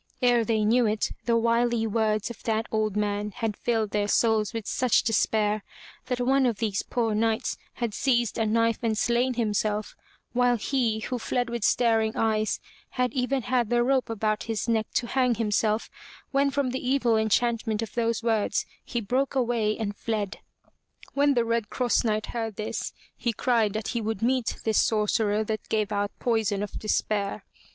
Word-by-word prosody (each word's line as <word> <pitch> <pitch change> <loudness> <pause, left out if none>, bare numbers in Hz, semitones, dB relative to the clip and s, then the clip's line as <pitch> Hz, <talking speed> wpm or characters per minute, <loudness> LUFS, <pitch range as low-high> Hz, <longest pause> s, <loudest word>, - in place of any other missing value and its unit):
Ere 240 -1 +4
they 220 -1 +1
knew 235 +2 +4
it, 215 0 0
the 235 -1 +3
wily 235 0 +2
words 215 0 0
of 235 - -11
that 225 0 0
old 215 -2 0
man 205 0 -1
had 225 -1 -3
filled 225 -3 -1
their 205 -1 0
souls 220 -1 +2
with 225 -2 -5
such 250 -2 +2
despair, 215 -1 +1 0.4
that 250 -1 -1
one 265 +1 +3
of 230 -4 -1
these 210 -3 -1
poor 230 -3 -1
knights 220 +1 0 0.2
had 235 -4 -3
seized 240 -2 +1
a 225 - +2
knife 230 +1 +2
and 225 -2 0
slain 240 +3 +1
himself, 215 -2 -1 0.4
while 245 0 +3
he, 230 -2 0
who 250 +2 -3
fled 245 +1 -1
with 235 -3 -3
staring 225 -1 +2
eyes, 215 -1 +1 0.3
had 250 -2 -1
even 260 0 0
had 245 -2 +1
the 240 0 +3
rope 260 -1 +1
about 215 -1 -1
his 225 +1 -2
neck 225 -2 +1
to 245 - +1
hang 250 0 +1
himself, 215 0 0 0.4
when 280 0 +3
from 275 -2 0
the 260 - -4
evil 250 -3 +2
enchantment 220 0 +1
of 225 - -8
those 230 -1 0
words 220 -3 +1 0.2
he 240 - -3
broke 260 +6 0
away 235 -4 +1
and 205 -2 -3
fled. 210 -2 -3 0.7
When 285 0 +3
the 235 -1 +2
Red 230 -2 -1
Cross 250 -2 +1
Knight 215 -1 0
heard 225 -3 -4
this, 215 - -3 0.2
he 235 - -1
cried 225 -3 +1
that 215 -1 -3
he 235 - -1
would 220 -1 -3
meet 250 -1 +1
this 220 -1 +3
sorcerer 215 0 +1
that 215 0 -4
gave 215 -1 0
out 205 0 0
poison 220 -4 0
of 210 - -6
despair. 210 -1 -1
225 Hz, 180 wpm, -26 LUFS, 215-240 Hz, 0.7 s, Ere